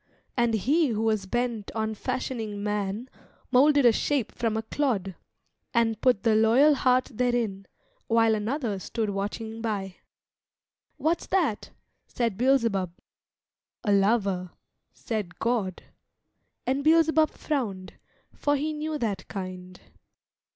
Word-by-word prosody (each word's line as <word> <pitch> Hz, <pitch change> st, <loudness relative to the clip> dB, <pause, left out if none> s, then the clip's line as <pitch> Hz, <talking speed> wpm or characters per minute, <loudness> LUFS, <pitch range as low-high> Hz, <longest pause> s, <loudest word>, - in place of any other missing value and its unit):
And 235 Hz, -2 st, +2 dB
He 290 Hz, -, +2 dB
who 220 Hz, -3 st, -1 dB
was 215 Hz, -3 st, 0 dB
bent 240 Hz, -1 st, -2 dB
on 220 Hz, 0 st, -1 dB
fashioning 225 Hz, -3 st, -4 dB
man 210 Hz, +2 st, -2 dB, 0.4 s
Moulded 285 Hz, +1 st, +5 dB
a 240 Hz, -, +8 dB
shape 265 Hz, +1 st, 0 dB
from 225 Hz, -2 st, -1 dB
a 220 Hz, -, -2 dB
clod, 220 Hz, -7 st, -1 dB, 0.6 s
And 225 Hz, -2 st, +2 dB
put 245 Hz, -6 st, +3 dB
the 225 Hz, -, +4 dB
loyal 230 Hz, +8 st, +5 dB
heart 255 Hz, -1 st, +2 dB
therein; 230 Hz, -5 st, -1 dB, 0.4 s
While 225 Hz, -1 st, +4 dB
another 215 Hz, -1 st, -2 dB
stood 215 Hz, +2 st, -2 dB
watching 220 Hz, +3 st, -4 dB
by. 200 Hz, -5 st, -3 dB, 1.0 s
"What's 320 Hz, +4 st, 0 dB
that?" 325 Hz, -, 0 dB, 0.4 s
said 230 Hz, -5 st, -1 dB
Beelzebub. 230 Hz, -7 st, +2 dB, 0.9 s
"A 205 Hz, -, +1 dB
lover," 195 Hz, -3 st, +2 dB, 0.4 s
said 210 Hz, -7 st, -5 dB
God. 220 Hz, -6 st, -1 dB, 0.8 s
And 270 Hz, +2 st, 0 dB
Beelzebub 320 Hz, 0 st, +4 dB
frowned, 210 Hz, -11 st, -3 dB, 0.4 s
for 290 Hz, 0 st, +1 dB
he 305 Hz, +2 st, -1 dB
knew 305 Hz, 0 st, -3 dB
that 205 Hz, -7 st, -3 dB
kind. 185 Hz, -1 st, -7 dB
225 Hz, 120 wpm, -27 LUFS, 205-260 Hz, 1.0 s, a